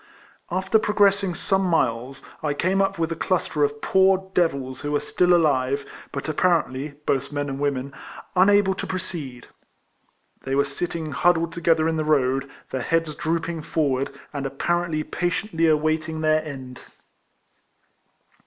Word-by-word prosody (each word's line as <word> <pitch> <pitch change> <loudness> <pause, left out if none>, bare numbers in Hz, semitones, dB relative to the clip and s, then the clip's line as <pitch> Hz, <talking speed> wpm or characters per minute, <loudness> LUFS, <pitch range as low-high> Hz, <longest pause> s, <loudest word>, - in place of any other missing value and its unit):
After 190 +5 +2
progressing 200 -3 +2
some 195 +4 +1
miles, 135 -7 0 0.2
I 150 -2 -1
came 190 +5 +1
up 195 - 0
with 165 0 -1
a - - -1
cluster 165 -3 0
of 145 0 -1
poor 190 0 +3
devils 140 -7 0
who 145 0 -3
were 145 - +3
still 180 0 +1
alive, 140 -5 +2 0.3
but 140 - -5
apparently, 150 -4 0
both 135 +1 0
men 145 0 -2
and 135 0 -4
wonien^ 140 -1 -1 0.4
unable 195 +1 +5
to - - -5
proceed. 160 -9 -5 1.0
They 135 0 -2
were 140 +1 +3
sitting 160 +2 -4
hud 175 +6 +3
dled 165 0 -2
together 165 -2 +2
in 165 0 0
the 155 - 0
road, 135 -3 +1 0.2
their 130 - -2
heads 165 -2 0
drooping 165 +1 -2
forward, 140 -4 0 0.2
and 140 -2 -2
apparently 165 +3 -1
patiently 175 0 -1
awaiting 155 +1 +1
their 155 0 +3
end. 130 -4 -8
155 Hz, 145 wpm, -24 LUFS, 140-175 Hz, 1.0 s, unable